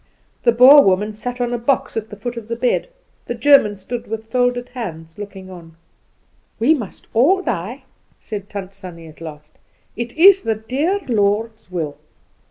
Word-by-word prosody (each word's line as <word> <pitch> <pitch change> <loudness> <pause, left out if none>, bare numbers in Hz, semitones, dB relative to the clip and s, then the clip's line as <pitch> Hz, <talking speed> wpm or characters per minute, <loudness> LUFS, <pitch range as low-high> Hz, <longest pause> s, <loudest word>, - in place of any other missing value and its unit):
The 235 - +4
Boer 255 +5 +9
woman 205 0 +1
sat 245 +4 -5
down 245 -1 -1
on - - -3
a - - 0
box 255 +3 0
at 220 -1 -3
the 210 - -9
foot 240 +4 -5
of 230 -2 -8
the 230 - -3
bed. 245 - 0 0.4
The 240 - -3
German 240 -4 +5
stood 230 +5 -6
with 220 0 -5
folded 245 0 0
hands 165 -9 -7
looking 190 -2 -9
on. 165 -3 -13 0.8
"We 240 +8 +4
must 230 - -6
all 350 +12 +3
die," 235 - -4 0.4
said 205 -3 -7
Tant 195 -1 -7
Sannie 180 -4 -10
at 155 +1 -15
last; 150 -2 -11 0.4
"it 235 0 -5
is 390 +3 +7
the 225 -8 -1
dear 275 - -1
Lord's 220 -1 0
will." 160 -5 -4
225 Hz, 180 wpm, -19 LUFS, 190-245 Hz, 0.8 s, Boer